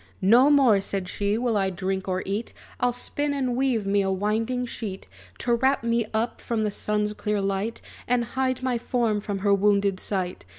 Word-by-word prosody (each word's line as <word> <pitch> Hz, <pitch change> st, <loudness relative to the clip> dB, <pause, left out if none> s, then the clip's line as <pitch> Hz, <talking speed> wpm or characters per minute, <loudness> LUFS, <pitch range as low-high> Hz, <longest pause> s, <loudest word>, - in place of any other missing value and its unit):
"No 240 Hz, +8 st, +6 dB
more," 260 Hz, -9 st, +5 dB
said 195 Hz, -1 st, -4 dB
she, 205 Hz, +3 st, -1 dB
"will 235 Hz, -1 st, 0 dB
I 195 Hz, -2 st, +2 dB
drink 190 Hz, +1 st, -3 dB
or 185 Hz, 0 st, -1 dB
eat! 205 Hz, +4 st, -3 dB, 0.3 s
I'll 245 Hz, -, +2 dB
spin 285 Hz, +4 st, -3 dB
and 255 Hz, -3 st, -1 dB
weave 250 Hz, -5 st, +1 dB
me 200 Hz, +1 st, +2 dB
a 195 Hz, -, 0 dB
winding 220 Hz, +6 st, 0 dB
sheet, 210 Hz, -, -6 dB, 0.3 s
To 240 Hz, -, 0 dB
wrap 265 Hz, +2 st, +2 dB
me 230 Hz, -1 st, +1 dB
up 225 Hz, +2 st, -2 dB
from 225 Hz, -2 st, -1 dB
the 210 Hz, -, 0 dB
sun's 210 Hz, +1 st, -1 dB
clear 210 Hz, 0 st, -1 dB
light, 195 Hz, +3 st, -2 dB, 0.2 s
And 240 Hz, -1 st, +2 dB
hide 260 Hz, +1 st, -1 dB
my 250 Hz, -2 st, 0 dB
form 230 Hz, -4 st, 0 dB
from 205 Hz, -1 st, -3 dB
her 200 Hz, -, +5 dB
wounded 200 Hz, -1 st, +2 dB
sight. 185 Hz, -3 st, -3 dB
215 Hz, 195 wpm, -25 LUFS, 200-245 Hz, 0.3 s, No